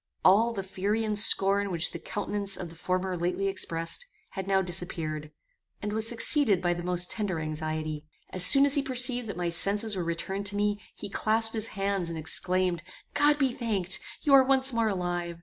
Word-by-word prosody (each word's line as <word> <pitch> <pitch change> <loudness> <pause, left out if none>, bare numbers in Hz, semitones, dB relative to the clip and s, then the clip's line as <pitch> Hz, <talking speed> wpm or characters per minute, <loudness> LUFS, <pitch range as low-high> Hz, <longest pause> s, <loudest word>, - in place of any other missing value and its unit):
All 220 +5 +5
the 200 -4 -4
fury 200 +4 -2
and 215 -1 -1
scorn 200 0 +4
which 170 -2 0
the - - -7
countenance 200 -1 -2
of 175 - -6
the 165 - -14
former 185 +2 -2
lately 180 +3 -1
expressed, 185 - -1 0.2
had 190 -1 -6
now 190 -1 +2
disappeared, 165 -4 -4 0.5
and 210 0 -4
was 220 +1 0
succeeded 235 - +3
by 175 0 0
the 175 - -6
most 180 0 -1
tender 200 -6 -2
anxiety. 155 0 -4 0.3
As 185 - 0
soon 275 +8 +6
as 280 - +3
he 285 - +3
perceived 255 -2 +2
that 205 - -6
my 175 -1 -1
senses 205 +5 +2
were 180 - -2
returned 190 +4 -3
to 205 - -3
me, 205 0 -1
he 205 - -7
clasped 220 +2 0
his 220 -1 -1
hands, 195 -3 -1
and 165 - -5
exclaimed, 180 +2 0 0.3
"God 290 0 +4
be 270 -4 +1
thanked! 205 -7 -2 0.2
you 285 - +2
are 270 -1 +8
once 265 0 +2
more 230 -1 +1
alive. 175 -3 -3
195 Hz, 195 wpm, -28 LUFS, 175-220 Hz, 0.5 s, are